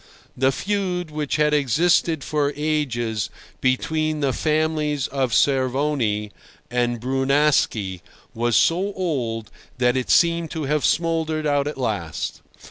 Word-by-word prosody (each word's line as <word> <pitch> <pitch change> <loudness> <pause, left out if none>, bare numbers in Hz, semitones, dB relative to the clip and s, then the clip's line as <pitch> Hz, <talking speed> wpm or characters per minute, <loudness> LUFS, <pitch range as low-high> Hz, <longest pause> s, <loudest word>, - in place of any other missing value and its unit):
The 130 +1 +2
feud 180 0 -2
which 150 -2 -2
had 150 0 +2
existed 155 +2 +2
for 145 -2 0
ages 125 -8 -1 0.3
between 155 +4 0
the 140 -3 +1
families 155 -2 0
of 135 -3 -1
Cervoni 130 -5 +1 0.4
and 120 -1 0
Brunaschi 135 - +1 0.3
was 120 0 0
so 190 +5 +2
old 120 - -3 0.3
that 125 0 +2
it 130 -1 -2
seemed 170 -1 +3
to 160 -1 -4
have 150 0 0
smouldered 160 -1 0
out 145 -1 +1
at 150 - -4
last. 105 - -3
145 Hz, 125 wpm, -22 LUFS, 125-155 Hz, 0.4 s, seemed